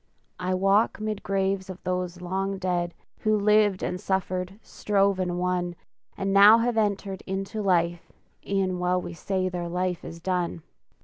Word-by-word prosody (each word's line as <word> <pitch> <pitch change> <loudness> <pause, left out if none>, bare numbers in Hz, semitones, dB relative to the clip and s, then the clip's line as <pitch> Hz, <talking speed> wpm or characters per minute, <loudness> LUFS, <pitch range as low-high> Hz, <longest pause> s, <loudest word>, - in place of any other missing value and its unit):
I 185 +1 0
walk 195 +5 +2
'mid 215 -1 -3
graves 195 0 -1
of 185 -1 -7
those 180 -1 -3
long 195 +2 -2
dead, 175 -2 -1 0.2
Who 215 -1 +2
lived 210 -2 +3
and 180 +1 -3
suffered, 190 0 -2
strove 200 -2 +1
and 180 -1 -1
won, 180 -1 -1 0.4
And 195 0 -1
now 205 +3 +9
have 235 +1 0
entered 200 -3 -1
into 195 +3 -3
life 175 -3 +1 0.3
E'en 190 -2 -1
while 180 0 +1
we 175 - -6
say 185 +2 -1
their 175 -1 -4
life 180 0 -2
is 165 - -8
done! 175 -2 -2
185 Hz, 160 wpm, -26 LUFS, 180-195 Hz, 0.4 s, now